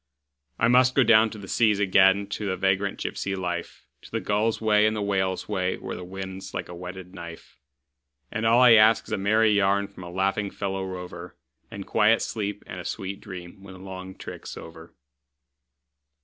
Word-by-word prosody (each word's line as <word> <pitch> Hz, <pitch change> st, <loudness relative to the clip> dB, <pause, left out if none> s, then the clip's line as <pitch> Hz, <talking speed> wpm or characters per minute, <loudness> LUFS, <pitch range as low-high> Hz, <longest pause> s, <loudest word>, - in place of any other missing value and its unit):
I 115 Hz, -, +3 dB
must 125 Hz, +1 st, +4 dB
go 135 Hz, -, +5 dB
down 110 Hz, -1 st, +5 dB
to 110 Hz, -, -9 dB
the 100 Hz, -2 st, -10 dB
seas 110 Hz, 0 st, +2 dB
again, 95 Hz, 0 st, +4 dB
to 105 Hz, +1 st, -4 dB
the 95 Hz, -1 st, -1 dB
vagrant 95 Hz, +1 st, 0 dB
gypsy 95 Hz, 0 st, -3 dB
life, 90 Hz, -2 st, -5 dB, 0.2 s
To -, -, -14 dB
the -, -, -2 dB
gull's 105 Hz, +2 st, 0 dB
way 105 Hz, -1 st, +4 dB
and 110 Hz, -, 0 dB
the 105 Hz, -, -2 dB
whale's 95 Hz, -2 st, -1 dB
way, 90 Hz, 0 st, -1 dB
where -, -, -6 dB
the -, -, -7 dB
wind's 95 Hz, +1 st, -7 dB
like -, -, -3 dB
a 90 Hz, -, -9 dB
whetted 90 Hz, +1 st, -9 dB
knife; 85 Hz, -6 st, -11 dB, 0.7 s
And 110 Hz, -1 st, -3 dB
all 115 Hz, +2 st, +5 dB
I 125 Hz, -1 st, +7 dB
ask 110 Hz, 0 st, +5 dB
is -, -, -11 dB
a -, -, 0 dB
merry 110 Hz, +2 st, +3 dB
yarn 100 Hz, 0 st, +2 dB
from 100 Hz, -2 st, -12 dB
a 85 Hz, -, -8 dB
laughing 95 Hz, +3 st, -1 dB
fellow 95 Hz, -1 st, -3 dB
rover, 90 Hz, -1 st, -8 dB, 0.3 s
And 100 Hz, -1 st, -8 dB
quiet 110 Hz, +1 st, +3 dB
sleep 105 Hz, -2 st, -4 dB
and 90 Hz, -, -8 dB
a -, -, -6 dB
sweet 100 Hz, 0 st, -5 dB
dream 90 Hz, -2 st, -10 dB
when 95 Hz, -1 st, -11 dB
the -, -, -13 dB
long 95 Hz, 0 st, -8 dB
trick's -, -, -9 dB
over. 80 Hz, 0 st, -12 dB
95 Hz, 195 wpm, -25 LUFS, 95-105 Hz, 0.7 s, I